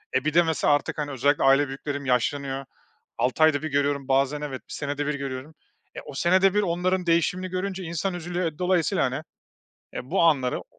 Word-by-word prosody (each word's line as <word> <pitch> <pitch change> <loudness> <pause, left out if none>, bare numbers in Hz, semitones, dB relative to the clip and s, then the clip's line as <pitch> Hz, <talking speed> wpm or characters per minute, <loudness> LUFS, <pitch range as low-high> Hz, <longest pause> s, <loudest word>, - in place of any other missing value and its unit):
e, 130 - +1
bir 155 - 0
de 175 +1 +6
mesela 160 -2 +2
artık 145 - -1
hani 145 -1 -3
özellikle 140 +3 +1
aile 135 +1 +5
büyüklerim 140 +1 -5
yaşlanıyor. 135 +2 -1 0.5
6 130 +5 +1
ayda 155 -2 +4
1 155 - -3
görüyorum 140 -1 0
bazen 135 +2 +1
evet, 135 -3 -5
1 - - -7
senede 145 0 -3
1 150 - 0
görüyorum. 140 +2 -6 0.4
E, - - -5
o - - -9
senede 185 +6 +3
1 210 - +3
onların 180 0 0
değişimini 170 +2 +1
görünce 190 +1 -3
insan 170 +3 -2
üzülüyor 175 -2 -3
dolayısıyla, 180 -3 +1
hani, - - -3 0.7
e, 130 - -7
bu 190 - +2
anları 140 -7 +2
o - - -14
150 Hz, 195 wpm, -25 LUFS, 140-175 Hz, 0.7 s, de